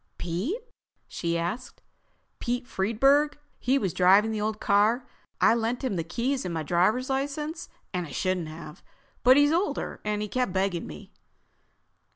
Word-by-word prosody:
"Pete?" 185 - -2 0.5
she 170 -1 -2
asked. 185 +9 -4 0.6
"Pete 245 +1 -2
Friedburg. 270 +8 +2 0.2
He 260 +3 +2
was 195 - -1
driving 195 +4 +5
the 215 -1 -2
old 215 0 -2
car. 215 +5 +3 0.3
I - - +5
lent 235 +3 -1
him 250 -7 -1
the 165 - -1
keys 245 +11 -1
and 180 - -3
my 160 -2 -2
driver's 185 - +2
license. 295 +5 -3 0.2
I 180 -3 -2
shouldn't 180 +3 -1
have—but 160 - -1
he's 290 +1 +5
older 355 +5 -1
and 210 0 -1
he - - -3
kept 250 -2 -1
begging 190 -2 -1
me...." 75 -1 -11
215 Hz, 150 wpm, -27 LUFS, 180-260 Hz, 0.6 s, driving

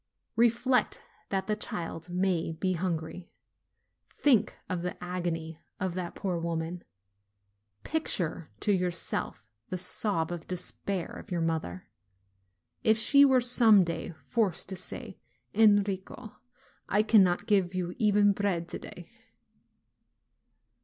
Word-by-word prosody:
Reflect 240 +2 +2 0.3
that 195 -1 -1
the 210 - 0
child 170 -4 -4
may 180 -2 0
be 185 +3 -1
hungry; 170 0 -3 0.8
think 265 -7 +2
of 180 -2 -3
the 180 +1 -4
agony 170 -3 -4 0.2
of 185 -2 -2
that 180 -1 -5
poor 185 -4 -2
woman. 170 +1 -3 1.0
Picture 180 - 0
to 210 - +2
yourself 175 - -1 0.2
the 185 - -2
sob 180 -2 -1
of 175 -2 -6
despair 180 0 -3
of - - -10
your 175 -2 -1
mother, 160 - -2 1.0
if 220 0 +4
she 280 +5 +7
were 265 -2 +5
some 230 -5 +5
day 165 0 -4
forced 215 -8 0
to 190 - -4
say, 185 - -6 0.3
"Enrico, 205 -1 +2 0.5
I 210 +2 +3
cannot 195 -5 +4
give 190 -4 +2
you 180 -1 -2
even 205 -2 +4
bread 190 -4 -1
to - - -5
day - - -10
185 Hz, 120 wpm, -29 LUFS, 170-210 Hz, 1.0 s, she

